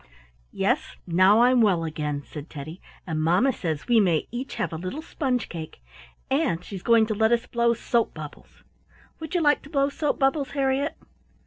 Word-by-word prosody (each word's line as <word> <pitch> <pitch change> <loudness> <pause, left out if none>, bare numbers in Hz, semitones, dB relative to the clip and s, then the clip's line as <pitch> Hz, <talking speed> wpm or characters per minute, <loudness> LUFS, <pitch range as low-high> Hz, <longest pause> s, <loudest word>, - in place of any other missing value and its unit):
"Yes, - - -1
now 185 +6 +5
I'm 250 0 +5
well 190 -6 +3
again," 150 -2 -3
said 150 0 -9
Teddy 155 +4 -8 0.2
"and 160 -4 -2
mamma 180 +12 +3
says 160 -7 -4
we 240 -2 +5
may 175 -7 +2
each 250 +3 -5
have - - -2
a - - -3
little 185 - -5
sponge 260 -7 -2
cake, 160 - -8 0.5
and 165 - 0
she's 195 -3 -7
going 230 +1 +4
to 215 - -2
let 220 +2 +2
us 235 0 +2
blow 235 0 +1
soap 235 0 0
bubbles. - - -11 0.6
Would 320 +3 -6
you 350 - +2
like 295 -2 +3
to 280 - -14
blow 280 -2 +1
soap 295 +1 -1
bubbles, 270 0 +1
Harriett?" 275 +1 0
225 Hz, 185 wpm, -25 LUFS, 170-270 Hz, 0.6 s, now